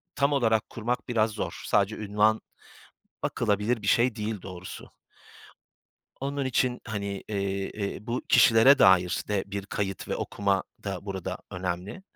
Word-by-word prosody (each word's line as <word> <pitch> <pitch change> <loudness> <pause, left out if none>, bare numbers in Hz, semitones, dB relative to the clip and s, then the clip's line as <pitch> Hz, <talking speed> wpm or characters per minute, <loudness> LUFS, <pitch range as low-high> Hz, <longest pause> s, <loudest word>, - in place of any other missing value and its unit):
tam 140 +1 +2
olarak 110 -5 +2
kurmak 120 +2 -3
biraz 110 -2 +2
zor. 105 - -5
Sadece 105 +1 +2
ünvan 105 +1 +2 0.8
bakılabilir 110 +1 0
bir - - -5
şey 120 -1 +3
değil 105 -2 -3
doğrusu. 90 -1 -9 1.3
Onun 140 0 -2
için, 125 -1 +1
hani, 105 -3 -4 0.2
eee, 100 -1 -2
eee, 105 +1 -5
bu 120 +2 -2
kişilere 125 +4 +7
dair 95 -1 +5
de 100 -2 0
bir 100 0 -5
kayıt 95 -1 -3
ve - - -1
okuma 100 -1 0 0.2
da 100 -1 -4
burada 95 -2 -4
önemli. 90 - -4
105 Hz, 140 wpm, -27 LUFS, 100-115 Hz, 1.3 s, kişilere